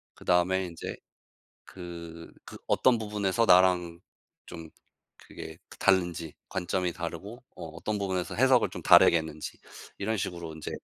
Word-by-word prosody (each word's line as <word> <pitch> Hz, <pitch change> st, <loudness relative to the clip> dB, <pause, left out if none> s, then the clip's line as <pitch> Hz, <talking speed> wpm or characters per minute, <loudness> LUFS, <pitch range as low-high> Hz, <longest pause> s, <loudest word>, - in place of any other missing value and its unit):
그 -, -, -16 dB
다음에 90 Hz, +1 st, +2 dB
인제 85 Hz, -1 st, -7 dB, 0.7 s
그 85 Hz, -2 st, -10 dB
그 -, -, -11 dB
어떤 125 Hz, -3 st, +3 dB
부분에서 105 Hz, 0 st, 0 dB
나랑 90 Hz, -2 st, +4 dB, 0.5 s
좀 80 Hz, -1 st, -9 dB, 0.5 s
그게 80 Hz, 0 st, -10 dB
그 -, -, -15 dB
다른지 90 Hz, -4 st, +1 dB
관점이 90 Hz, -1 st, -1 dB
다르고 85 Hz, +7 st, -7 dB
어 -, -, -7 dB
어떤 95 Hz, +7 st, -4 dB
부분에서 95 Hz, -3 st, -2 dB
해석을 130 Hz, 0 st, +4 dB
좀 -, -, -8 dB
다르게 85 Hz, -, +7 dB
했는지 80 Hz, -1 st, -7 dB, 0.4 s
이런 110 Hz, +3 st, -1 dB
식으로 85 Hz, -4 st, -5 dB
인제 80 Hz, -, -7 dB
90 Hz, 295 characters per minute, -28 LUFS, 85-100 Hz, 0.7 s, 다르게